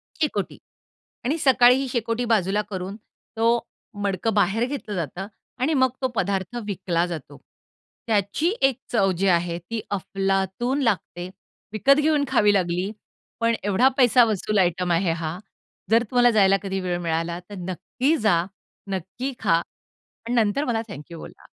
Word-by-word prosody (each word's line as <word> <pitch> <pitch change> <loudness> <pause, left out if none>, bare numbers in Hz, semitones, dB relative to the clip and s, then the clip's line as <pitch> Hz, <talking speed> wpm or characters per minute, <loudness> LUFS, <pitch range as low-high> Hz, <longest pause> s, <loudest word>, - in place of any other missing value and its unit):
शेकोटी 300 - -2 0.7
आणि 290 +6 +1
सकाळी 255 -4 +6
ही 270 +1 -1
शेकोटी 235 0 -1
बाजूला 210 -3 +2
करून 190 0 -5 0.4
तो 230 +1 +3 0.4
मडकं 200 +3 0
बाहेर 205 +3 +2
घेतलं 255 -7 -5
जातं 175 +3 -4 0.3
आणि 295 +5 +2
मग 260 -3 +4
तो 260 - +2
पदार्थ 195 0 -1
विकला 175 -4 -1
जातो. 155 -4 -7 0.7
त्याची 215 - +1 0.2
एक 270 -3 +2
चव 195 -5 +3
जी 195 +2 +1
आहे, 170 -1 +2
ती 220 +6 -5
अफलातून 195 +6 -1
लागते. 180 -5 -1 0.5
विकत 275 +7 +4
घेऊन 300 -1 +2
खावी 210 -6 +4
लागली 180 0 0 0.5
पण 230 0 +2
एवढा 205 +6 +3
पैसा 250 -1 +6
वसूल 215 -1 -1
आयटम 180 0 +1
आहे 170 +1 +2
हा. 165 0 -3 0.5
जर 230 +1 +5
तुम्हाला 245 -1 +4
जायला 195 -2 +4
कधी 195 -1 -2
वेळ 180 -1 -2
मिळाला 165 +1 -2
तर 205 - -8
नक्की 250 - 0
जा, 200 - +2 0.5
नक्की 195 +9 -4
खा 170 -6 +3 0.5
आणि 235 +2 -8
नंतर 230 +4 +2
मला 225 -4 0
थँक 170 -4 -10
यू 170 - -7
बोला. - - -12
205 Hz, 150 wpm, -24 LUFS, 180-240 Hz, 0.7 s, सकाळी